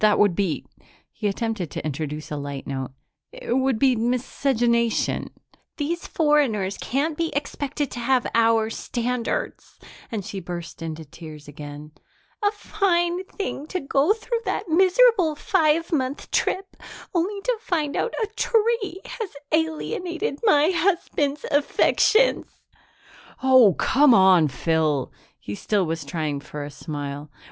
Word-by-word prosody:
"That 215 Hz, -1 st, +5 dB
would 205 Hz, -4 st, +4 dB
be 190 Hz, -5 st, -1 dB, 0.2 s
" -, -, -31 dB
he 210 Hz, -, -2 dB
attempted 210 Hz, -4 st, -2 dB
to -, -, -6 dB
introduce 150 Hz, +1 st, -4 dB
a -, -, -2 dB
light 140 Hz, -1 st, -5 dB
note 130 Hz, -2 st, -4 dB, 0.4 s
"it -, -, -4 dB
would 260 Hz, -3 st, +1 dB
be 260 Hz, +1 st, +4 dB
miscegenation." 235 Hz, 0 st, 0 dB, 0.5 s
"These 330 Hz, +4 st, -2 dB
foreigners 270 Hz, -, +1 dB
can't 295 Hz, +5 st, -1 dB
be 330 Hz, +1 st, -1 dB
expected 285 Hz, 0 st, -3 dB
to 240 Hz, -, -6 dB
have 250 Hz, +1 st, +2 dB
our 225 Hz, -1 st, +3 dB
standards." 245 Hz, -, -3 dB, 0.3 s
And 210 Hz, -5 st, -3 dB
she 200 Hz, -2 st, -5 dB
burst 170 Hz, -3 st, -7 dB
into 160 Hz, -1 st, -5 dB
tears 150 Hz, 0 st, -11 dB
again. 145 Hz, +1 st, -9 dB, 0.5 s
"A 410 Hz, -, +4 dB
fine 365 Hz, -4 st, 0 dB
thing 380 Hz, -7 st, -5 dB
to 370 Hz, -, -2 dB
go 275 Hz, +4 st, +2 dB
through 460 Hz, +1 st, -3 dB
that 380 Hz, -, -2 dB
miserable 370 Hz, 0 st, +4 dB
five 325 Hz, 0 st, +1 dB
month 270 Hz, -3 st, -2 dB
trip 385 Hz, +1 st, -1 dB, 0.4 s
only 380 Hz, +4 st, 0 dB
to -, -, 0 dB
find 315 Hz, -9 st, -1 dB
out 475 Hz, -, -1 dB
a -, -, -1 dB
tree 445 Hz, -4 st, +1 dB
has 445 Hz, -5 st, -5 dB, 0.2 s
alienated 330 Hz, +2 st, -1 dB
my 320 Hz, -6 st, +4 dB
husband's 330 Hz, -6 st, 0 dB
affections." 430 Hz, +10 st, +3 dB, 1.0 s
"Oh, 255 Hz, -8 st, +6 dB
come 275 Hz, -2 st, +5 dB
on, 185 Hz, -4 st, +6 dB
Phyl!" 155 Hz, -1 st, 0 dB, 0.3 s
He 100 Hz, -, -7 dB
still 195 Hz, -, 0 dB
was 160 Hz, -1 st, -3 dB
trying 145 Hz, 0 st, -3 dB
for 145 Hz, +1 st, -7 dB
a 145 Hz, -, -7 dB
smile. 145 Hz, 0 st, -6 dB
255 Hz, 135 wpm, -24 LUFS, -, 1.0 s, Oh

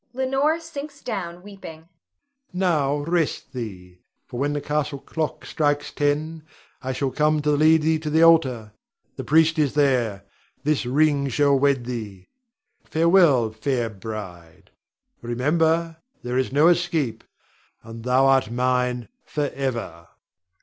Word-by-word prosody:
[Leonore 270 Hz, +5 st, +1 dB
sinks 295 Hz, -3 st, -8 dB
down 180 Hz, -6 st, -5 dB
weeping.] 165 Hz, -5 st, -11 dB, 0.6 s
Now 155 Hz, -6 st, 0 dB
rest 165 Hz, -3 st, -1 dB
thee; 90 Hz, -7 st, -8 dB, 0.3 s
for 120 Hz, -, -7 dB
when 145 Hz, +2 st, 0 dB
the 145 Hz, -, -1 dB
castle 150 Hz, 0 st, -2 dB
clock 155 Hz, +3 st, -4 dB
strikes 145 Hz, -1 st, -1 dB
ten, 150 Hz, +2 st, -1 dB, 0.4 s
I 130 Hz, -, -3 dB
shall 130 Hz, +1 st, -2 dB
come 150 Hz, +2 st, +2 dB
to 150 Hz, -, +2 dB
lead 155 Hz, +2 st, +4 dB
thee 160 Hz, 0 st, +2 dB
to 155 Hz, -1 st, -4 dB
the 160 Hz, +2 st, +3 dB
altar. 130 Hz, -10 st, +3 dB, 0.4 s
The -, -, -6 dB
priest 160 Hz, +1 st, +3 dB
is 145 Hz, -3 st, +1 dB
there, 125 Hz, -9 st, +1 dB, 0.4 s
this 145 Hz, -4 st, 0 dB
ring 140 Hz, +1 st, +2 dB
shall 140 Hz, +2 st, +2 dB
wed 140 Hz, -3 st, +2 dB
thee. 105 Hz, -7 st, -7 dB, 0.5 s
Farewell, 160 Hz, -, +3 dB
fair 115 Hz, +1 st, -2 dB
bride; 95 Hz, -6 st, -9 dB, 0.5 s
remember, 160 Hz, +7 st, 0 dB, 0.3 s
there 125 Hz, 0 st, -3 dB
is 130 Hz, 0 st, 0 dB
no 145 Hz, +4 st, +4 dB
escape, 160 Hz, -10 st, 0 dB, 0.6 s
and 115 Hz, 0 st, -10 dB
thou 125 Hz, +2 st, +3 dB
art 135 Hz, -4 st, +3 dB
mine 125 Hz, 0 st, 0 dB, 0.2 s
forever. 130 Hz, -, -4 dB
145 Hz, 130 wpm, -23 LUFS, 125-160 Hz, 0.6 s, lead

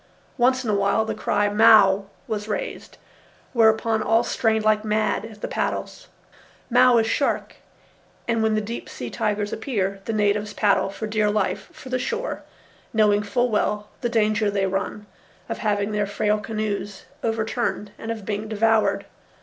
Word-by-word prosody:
Once 255 Hz, +1 st, +2 dB
in 230 Hz, -, -3 dB
a -, -, +2 dB
while 200 Hz, +2 st, +2 dB
the 220 Hz, -, -2 dB
cry 205 Hz, -1 st, 0 dB
Mao! 205 Hz, -2 st, +6 dB, 0.2 s
was 210 Hz, -1 st, -3 dB
raised, 210 Hz, -, -5 dB, 0.6 s
whereupon 220 Hz, -1 st, +3 dB
all 225 Hz, +2 st, +3 dB
strained 220 Hz, -2 st, 0 dB
like 215 Hz, 0 st, +3 dB
mad 215 Hz, 0 st, 0 dB
at 215 Hz, -2 st, -12 dB
the -, -, -2 dB
paddles. -, -, -3 dB, 0.6 s
Mao 250 Hz, 0 st, +6 dB
is 225 Hz, -, +3 dB
shark, 275 Hz, +5 st, -1 dB, 0.7 s
and 230 Hz, -1 st, +1 dB
when 220 Hz, -1 st, +2 dB
the 215 Hz, -, +1 dB
deep 230 Hz, +3 st, -6 dB
sea -, -, -7 dB
tigers 210 Hz, -2 st, -1 dB
appear, 200 Hz, -5 st, -2 dB
the 225 Hz, -, -2 dB
natives 210 Hz, 0 st, 0 dB
paddle 195 Hz, -2 st, +2 dB
for 200 Hz, +3 st, -5 dB
dear 215 Hz, -1 st, +1 dB
life 205 Hz, -2 st, -1 dB
for 260 Hz, -, -12 dB
the 255 Hz, 0 st, 0 dB
shore, -, -, -3 dB, 0.5 s
knowing 210 Hz, -2 st, +4 dB
full 240 Hz, +4 st, 0 dB
well 210 Hz, 0 st, 0 dB
the 240 Hz, -, 0 dB
danger 215 Hz, -2 st, +2 dB
they 200 Hz, -1 st, 0 dB
run 195 Hz, +2 st, -3 dB, 0.4 s
of -, -, -4 dB
having 205 Hz, -1 st, 0 dB
their 210 Hz, -1 st, 0 dB
frail 210 Hz, +1 st, 0 dB
canoes 210 Hz, -2 st, -4 dB, 0.2 s
overturned 225 Hz, -1 st, -2 dB
and 225 Hz, -, -6 dB
of 220 Hz, -3 st, -4 dB
being 210 Hz, +1 st, -3 dB
devoured. 220 Hz, 0 st, +2 dB
215 Hz, 165 wpm, -23 LUFS, 205-225 Hz, 0.7 s, Mao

